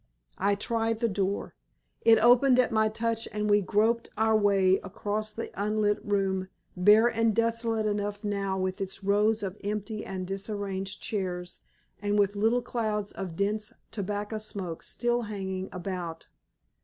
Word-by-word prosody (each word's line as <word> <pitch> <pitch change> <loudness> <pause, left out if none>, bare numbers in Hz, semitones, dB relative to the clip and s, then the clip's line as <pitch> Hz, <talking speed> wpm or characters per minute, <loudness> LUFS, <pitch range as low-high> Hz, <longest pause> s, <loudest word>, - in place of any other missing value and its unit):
I 200 - +2
tried 225 +1 -1
the 235 - +2
door. 200 -1 -2 0.5
It 225 -1 +6
opened 245 +2 +6
at 255 - +3
my 220 -1 +3
touch 230 +1 -2
and 210 0 -1
we 205 0 +4
groped 220 +4 +1
our 220 0 +3
way 195 -3 +4
across 210 +3 -4
the 225 +2 -6
unlit 210 0 0
room, 195 -2 0 0.3
bare 210 +5 +6
and 225 -2 +1
desolate 230 -1 +1
enough 205 0 -2
now 200 -2 -1
with 185 0 -2
its 195 0 -5
rows 210 +2 +2
of 195 0 -5
empty 210 +1 -3
and 185 -1 -5
disarranged 195 0 -4
chairs, 180 -4 -3 0.4
and 205 0 +1
with 205 0 +2
little 225 +4 +2
clouds 215 -4 -2
of 180 -4 -6
dense 210 +3 -1 0.2
tobacco 205 +1 -3
smoke 190 -6 -5
still 240 0 -1
hanging 190 -2 -4
about. 180 -3 -5
205 Hz, 150 wpm, -28 LUFS, 195-220 Hz, 0.5 s, It